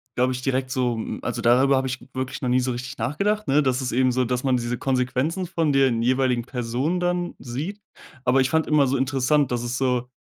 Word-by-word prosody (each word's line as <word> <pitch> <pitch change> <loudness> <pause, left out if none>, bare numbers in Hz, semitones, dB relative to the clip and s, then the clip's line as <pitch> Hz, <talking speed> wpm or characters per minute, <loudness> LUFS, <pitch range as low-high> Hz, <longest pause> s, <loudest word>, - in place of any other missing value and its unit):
glaube 125 +1 +2
ich, 125 0 -5
direkt 130 -1 0
so 125 -2 0
hm, 110 - -5
also - - -3
darüber 130 +4 +4
habe 130 0 0
ich 130 0 -3
wirklich 130 +1 -4
noch 125 - 0
nie 125 +1 +3
so 130 0 -1
richtig 125 +2 -5
nachgedacht, 205 +8 -1
ne? 145 +2 +3
Dass 130 0 +1
es 125 - -2
eben 130 +1 +2
so 130 +1 +1
dass 125 +1 -2
man 130 -2 +2
diese 120 0 -2
Konsequenzen 135 +7 -1
von 165 -5 0
den 130 -4 +3
jeweiligen 125 -1 +1
Personen 125 +8 -2
dann 175 0 -1
sieht. 155 +12 -5 0.4
Aber 130 +2 +4
ich 130 - 0
fand 160 0 +1
immer 150 -2 +4
so 135 +1 0
interessant, 135 +1 +1
dass 120 -1 -1
es 120 +1 -3
so 125 -2 0
130 Hz, 230 wpm, -24 LUFS, 125-140 Hz, 0.4 s, darüber